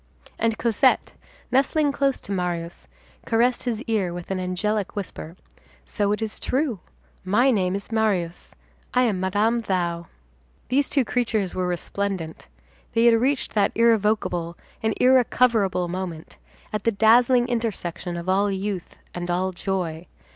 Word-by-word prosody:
And 225 -1 +1
Cosette, 240 +3 +2 0.4
nestling 280 +3 +2
close 275 -1 0
to - - -8
Marius, 175 -3 -3 0.4
caressed 240 +2 +2
his 235 -1 -2
ear 205 -8 -1
with 175 +1 -7
an 190 - -1
angelic 190 +3 -2
whisper: 185 -4 -6 0.5
"So 205 -2 0
it 210 +2 -1
is 215 -1 -5
true. 260 - -1 0.4
My 225 +8 +3
name 190 -5 +1
is 200 +3 -6
Marius. 195 -6 -1 0.4
I 250 - +5
am 210 -6 +1
Madame 210 +5 +1
Thou." 170 -5 -2 0.6
These 275 +3 +2
two 275 -4 +2
creatures 220 -5 -1
were 185 -1 -1
resplendent. 180 -1 -3 0.5
They 230 +1 +3
had 230 -1 +5
reached 270 +2 0
that 205 -2 +2
irrevocable 210 -7 +1 0.2
and 220 -1 0
irrecoverable 235 -7 +3
moment, 175 -3 -6 0.4
at 210 -2 -2
the 230 - +3
dazzling 240 +3 +4
intersection 190 -7 -3
of 170 +1 -6
all 195 +2 +2
youth 195 -2 -4 0.2
and 175 0 -5
all 185 +2 0
joy. 180 -3 -3
205 Hz, 140 wpm, -24 LUFS, 180-235 Hz, 0.6 s, I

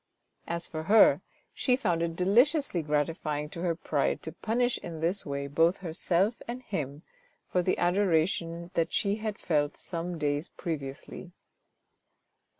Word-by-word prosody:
As 170 0 -2
for 155 0 -5
her, 215 +3 +6 0.3
she 250 - +2
found 180 -10 0
it 165 -1 -1
deliciously 235 - +3
gratifying 150 0 -1
to 170 0 -7
her 175 -2 +1
pride - - -1
to - - -5
punish 245 +2 0
in 165 -2 -7
this 170 +4 0
way 140 0 -2
both 165 +6 +3
herself 185 +4 0
and 245 +2 -5
him 150 - -4 0.5
for 180 - +3
the 185 - +1
adoration 170 -2 +1
that 165 0 +1
she 200 0 +1
had 215 -1 -3
felt 150 -3 0
some 175 0 -4
days 145 +1 -1
previously. 155 +1 -6
170 Hz, 145 wpm, -29 LUFS, 155-195 Hz, 0.5 s, her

